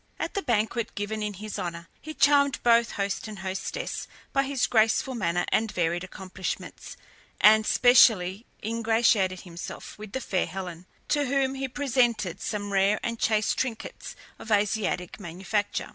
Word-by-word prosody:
At - - -3
the 400 - -1
banquet 230 - -1
given 210 +1 -3
in 210 -1 -3
his 215 +2 -6
honour, 170 -1 -5
he 310 0 -8
charmed 280 -1 +4
both 235 -1 +4
host 200 +2 -2
and 215 -1 -8
hostess 190 0 -4 0.3
by 275 - +3
his 275 -1 0
graceful 225 +4 +2
manner 175 -7 0
and 220 -1 +1
varied 175 -2 0
accomplishments, 185 0 -6 0.4
and 215 +1 +6
specially 225 -5 +5 0.2
ingratiated 225 -4 +2
himself 170 +2 -9
with 210 -1 -9
the 265 - -1
fair 190 -6 -1
Helen, 180 -2 -7 0.2
to 290 -1 +2
whom 270 0 +1
he 270 0 -3
presented 240 - 0
some 205 -2 -3
rare 195 +2 +3
and 230 -1 -3
chaste 215 -1 +1
trinkets 240 -4 -4 0.2
of - - -10
Asiatic 205 -3 0
manufacture. 190 +3 -3
215 Hz, 150 wpm, -27 LUFS, 190-235 Hz, 0.4 s, and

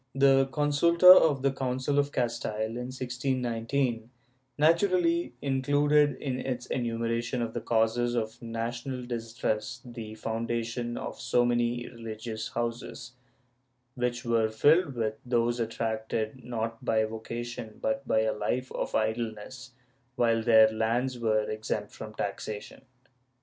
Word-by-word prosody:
^ - - -3
The 135 -1 +5
consulta 150 +4 +1
of 145 -7 +4
the 140 - +3
Council 130 +2 -1
of 145 0 +1
Castile, 115 -3 -2
in 125 +1 -4
1619, 125 -2 -2 0.5
naturally 170 -1 +2
included 145 +1 +3
in 130 -1 -3
its 125 -2 -3
enumeration 115 0 -2
of 115 -1 -2
the - - -3
causes 120 +1 +1
of 110 +1 -3
national 120 +2 -4
distress 115 -2 -3
the 115 -3 -8
foundation 115 +2 -3
of - - -6
so 120 - +2
many 120 0 0
religious 110 -1 -6
houses, 120 +1 -4 0.8
which 125 0 -2
were 115 -2 +2
filled 145 +6 +3
with 110 -2 -2
those 120 -1 +1
attracted, 110 +1 -2
not 115 -1 -4
by 110 -1 +2
vocation 115 0 -6
but 135 -1 -2
by 110 - +3
a 110 0 +1
life 125 +5 -2
of - - -3
idleness, 110 +3 -3 0.4
while 115 -2 +2
their 110 -1 +7
lands 120 +3 0
were 110 -2 +2
exempt 110 -1 -3
from 110 -1 -9
taxation. 105 +1 -5
120 Hz, 130 wpm, -28 LUFS, 115-130 Hz, 0.8 s, their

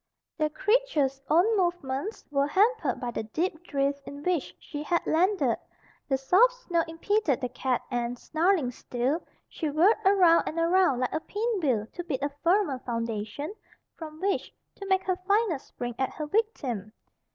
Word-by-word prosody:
The 305 -2 0
creature's 305 - +1
own 365 +8 +4
movements 345 -1 -2
were 280 0 +2
hampered 380 - +2
by 245 -1 -3
the - - -3
deep 320 - -3
drift 280 0 0
in 285 0 -8
which 355 -4 -1
she 295 -2 -7
had 340 +3 0
landed. 370 +5 +2 0.5
The 270 - +2
soft 375 - +4
snow 360 -10 -1
impeded 330 - 0
the 250 -2 -3
cat 250 0 -1
and, 240 0 -2
snarling 320 -2 +1
still, 250 +6 -2 0.3
she 315 - -3
whirled 340 +10 +4
around 370 -4 +5
and 320 - -4
around 335 -6 +3
like 255 - -1
a - - 0
pinwheel 360 - -1
to 350 - -5
beat 280 -5 -3
a 285 - +1
firmer 345 -7 +2
foundation 230 - -4 0.4
from 310 -1 -9
which 390 +2 -1 0.3
to 395 - -7
make 380 0 +2
her 370 -1 0
final 405 -7 +2
spring 245 -2 -6
at 265 - +1
her 305 - -4
victim. 275 - -1
315 Hz, 165 wpm, -28 LUFS, 265-380 Hz, 0.5 s, around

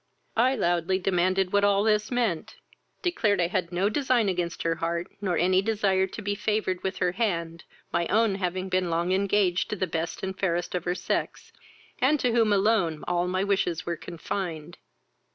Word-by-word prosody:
I 255 +4 +3
loudly 175 -3 +1
demanded 185 0 +1
what 205 0 +3
all 200 0 +3
this 215 0 +2
meant, 230 -10 -1 0.5
declared 220 - +1
I 175 - +3
had 170 0 -2
no 180 +3 +1
design 245 -2 +2
against 175 -2 -2
her 165 - +1
heart, 170 +1 -2 0.2
nor 185 -4 0
any 185 +2 +3
desire 195 -3 +1
to 210 - -8
be 205 +1 -1
favoured 210 -3 -1
with 190 0 -3
her 180 - +1
hand, 170 -5 -2 0.3
my 170 - +1
own 220 -1 +3
having 185 -1 -2
been 185 -1 0
long 170 +2 0
engaged 195 -1 +1
to - - -2
the 190 - -1
best 165 0 -4
and 190 0 -3
fairest 175 -2 -1
of 180 -2 -2
her 175 0 0
sex, - - -3 0.5
and 285 +4 +3
to 250 - +1
whom 225 -2 +3
alone 195 -6 +2
all 175 0 +1
my 185 +1 0
wishes 195 -4 0
were 170 - -2
confined. 170 -1 -5
185 Hz, 185 wpm, -27 LUFS, 175-205 Hz, 0.5 s, I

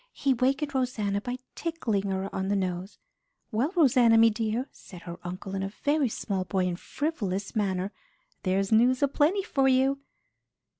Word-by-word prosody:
He 275 - +1
wakened 275 +4 0
Rosanna 215 -6 -1
by 245 +2 -4 0.2
tickling 225 - -2
her 190 0 -1
on 190 0 -2
the 205 - +1
nose. 185 0 -3 0.5
"Well, 245 +8 0
Rosanna, 245 -8 +5
me 225 0 +6
dear," 225 +4 -2
said 180 -3 -13
her 170 -1 -8
uncle 185 +2 -6
in 195 - -2
a 195 - -2
very 285 +5 0
small 195 -3 -2
boy 185 0 0
and 175 -1 -2
frivolous 205 - -3
manner, 195 -2 0 0.5
"there's 195 +1 0
news 245 +4 +4
a - - +5
plenty 315 +8 +2
for 270 -6 +1
you." 265 +1 +3
220 Hz, 165 wpm, -28 LUFS, 195-265 Hz, 0.5 s, me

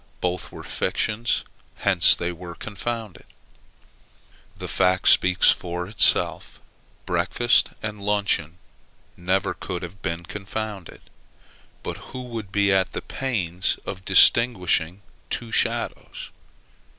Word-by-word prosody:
Both 90 0 -3
were - - -10
fictions. 115 +2 -1 0.3
Hence 95 -4 +5
they 85 +1 -3
were 85 0 -9
confounded. 110 0 -6 1.3
That - - -6
fact 90 0 +2
speaks 90 -1 +5
for 90 0 -4
itself, 105 - +2 0.5
breakfast 120 0 +2
and 105 -1 -5
luncheon 100 -6 0 0.6
never 95 +2 0
could 90 -1 -6
have 90 +3 -9
been 85 +1 -4
confounded; 100 +1 -6 0.8
but - - -5
who 130 - -7
would 115 -5 -7
be 100 -1 +2
at 95 -1 +1
the - - -4
pains 95 -9 -2
of 95 -1 -6
distinguishing 95 -3 +4 0.3
two 115 -1 -4
shadows? - - -2
95 Hz, 110 wpm, -24 LUFS, 90-110 Hz, 1.3 s, Hence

